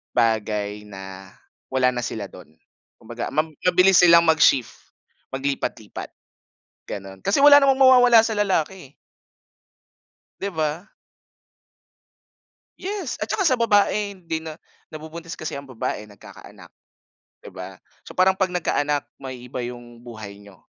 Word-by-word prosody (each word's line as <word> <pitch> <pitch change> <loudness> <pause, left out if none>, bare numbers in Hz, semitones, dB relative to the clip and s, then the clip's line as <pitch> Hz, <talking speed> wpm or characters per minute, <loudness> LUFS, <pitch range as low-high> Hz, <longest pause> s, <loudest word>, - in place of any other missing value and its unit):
bagay 105 -3 -1
na 95 -1 -11 0.3
wala 130 -1 +2
na 120 -1 -4
sila 100 -3 -6
do’n. 80 -4 -15 0.4
Kumbaga - - -7
mab 155 +2 -1
mabilis 180 +1 +4
silang 170 -1 +7
mag-shift, 155 -6 +3 0.6
maglipat-lipat, 135 +1 -4 0.7
gano’n 95 -1 -9
kasi 205 +7 +2
wala 285 0 +8
namang 270 -1 +3
mawawala 245 -3 +7
sa 220 -1 -1
lalaki 190 -7 -1
eh. - - -41 1.5
‘Di 200 - -2
ba. 155 +2 -2 1.9
Yes, 400 +2 -4
at - - -5
tsaka 385 -4 +1
sa 260 - +3
babae 210 -3 +1
hindi 160 -2 -4
na 160 -1 -8 0.3
nabubuntis 160 +1 -9
kasi 155 - -5
ang 140 - -7
babae, 115 -4 -4
nagkakaanak 100 - -14 0.7
‘di - - -12
ba. - - -10 0.2
So - - -11
parang 190 +1 +3
‘pag 190 -1 0
nagkaanak 150 -4 -1
maiiba 125 -2 -7
yung 120 -1 -10
buhay 110 -4 -9
niyo. 100 -3 -17
155 Hz, 125 wpm, -22 LUFS, 115-190 Hz, 1.9 s, wala